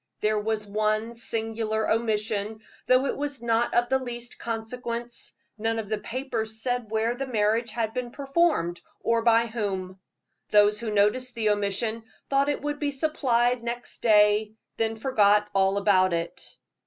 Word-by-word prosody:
There 215 0 +2
was 215 0 -2
one 215 +2 0
singular 225 -1 -2
omission, 220 -1 -1 0.3
though 255 +1 +4
it - - -1
was 285 -3 -4
not 235 0 +1
of 240 0 +3
the 265 +2 +2
least 240 -1 -7
consequence 235 +1 -5 0.2
none 225 +1 0
of 215 -3 -4
the 215 - -1
papers 230 -3 -4
said 245 -1 -2
where 220 +2 +1
the 270 +2 -4
marriage 225 0 +1
had 225 -1 -2
been 250 -1 -3
performed, 275 - 0 0.2
or 230 0 +2
by 230 0 +4
whom. 195 -5 -4 0.5
Those 210 0 +5
who 235 -1 -3
noticed 225 +5 +2
the 220 -2 +2
omission 210 +2 -1 0.3
thought 275 +1 +3
it 290 - -2
would 295 0 -2
be 290 - 0
supplied 250 -4 +1
next 240 +1 -6
day, 210 -1 +4 0.2
then 225 0 0
forgot 210 -4 +3
all 195 0 +3
about 185 -3 +3
it. 170 0 -5
225 Hz, 155 wpm, -26 LUFS, 210-240 Hz, 0.5 s, Those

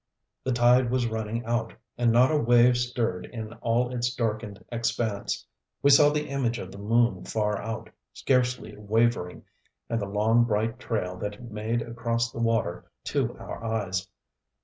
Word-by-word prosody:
The 130 - 0
tide 120 +1 +4
was 125 0 +1
running 110 +1 -3
out, 115 -1 -1 0.2
and 120 -1 +2
not 125 +5 +5
a - - +2
wave 120 -1 +5
stirred 120 -7 -1
in 110 -2 -7
all 120 +2 +1
its 120 0 0
darkened 110 -3 -3
expanse. 115 -3 -2 0.4
We 140 - +6
saw 145 +1 +8
the 150 0 -1
image 130 -4 -1
of 95 -3 -7
the 100 - -10
moon 110 -2 +2
far 105 -2 -1
out, 110 0 -5 0.2
scarcely 125 -1 0
wavering, 105 -3 0 0.5
and 115 -1 0
the 100 - -3
long, 110 +4 +3
bright 115 +2 -1
trail 90 -8 -2
that 105 +2 -4
it 120 +2 -11
made 110 +2 -1
across 115 0 -2
the - - -7
water 115 -6 0 0.2
to - - -1
our - - -8
eyes. 100 -4 -2
115 Hz, 165 wpm, -27 LUFS, 105-120 Hz, 0.5 s, saw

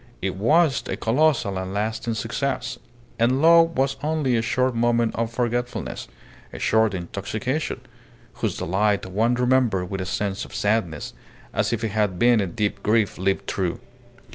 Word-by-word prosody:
It 95 0 -2
was 145 - +3
a - - -3
colossal 120 -6 +1
and 95 +1 -5
lasting 110 +2 -2
success; 105 - -3 0.4
and 125 +3 +3
love 165 0 +5
was 135 +1 +1
only 150 -4 0
a 115 - +2
short 125 +2 +1
moment 115 0 +1
of 115 0 -1
forgetfulness, 120 +1 -2 0.4
a - - -8
short 110 -2 +2
intoxication, 105 - -3 0.5
whose - - -2
delight 100 +3 +1
one 110 +6 +1
remembered 125 -7 +1
with 95 -1 -3
a 95 - -4
sense 100 +1 -2
of - - -10
sadness, 100 -8 -1 0.4
as - - 0
if - - -2
it 110 - 0
had 105 -3 0
been 120 +1 +4
a 95 - -1
deep 100 +3 -2
grief 105 -2 +1
lived 95 +1 0
through. 90 -3 -2
110 Hz, 160 wpm, -23 LUFS, 100-125 Hz, 0.5 s, love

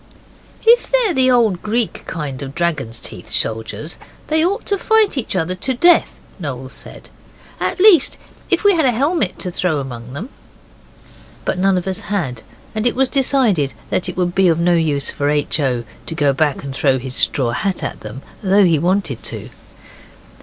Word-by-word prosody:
'If 475 +1 +4
they're - - +3
the 260 -2 +3
old 225 -8 +3
Greek 225 +1 -2
kind 145 -4 -5
of 140 0 -7
dragon's 145 -10 -2
teeth - - -7
soldiers, 115 +8 -1 0.3
they 315 +1 +3
ought 395 +6 -1
to 400 - 0
fight 440 -3 +3
each 250 -7 -2
other 180 0 0
to 255 +8 -3
death,' 345 +7 +4 0.2
Noel 130 -5 -5
said; - - -10 0.5
'at - - -2
least, 370 -7 +5 0.3
if - - +1
we 405 -1 +6
had 320 -3 +2
a 245 - +2
helmet 280 - 0
to 180 - -5
throw 175 -3 0
among 125 -2 -7
them.' 195 - -6 1.2
But 180 - -1
none 195 0 +3
of 180 - -3
us 190 -1 -1
had, 145 - -2 0.3
and 220 +2 0
it 240 - +1
was 265 0 +2
decided 250 - +2 0.2
that - - 0
it - - -7
would 175 -1 0
be 190 0 +3
of 165 -1 +2
no 175 +1 +3
use 150 -4 +1
for 145 0 -1
H. 150 +1 0
O. 125 -4 0 0.2
to 165 - -4
go 145 -4 +2
back 145 0 0
and 140 -1 -6
throw 135 -1 +2
his 130 0 -6
straw 125 -4 +3
hat 195 - -2
at - - -4
them, 110 +5 -9 0.2
though 195 0 +4
he 165 -4 +3
wanted 175 - 0
to. - - -6
180 Hz, 190 wpm, -18 LUFS, -, 1.2 s, we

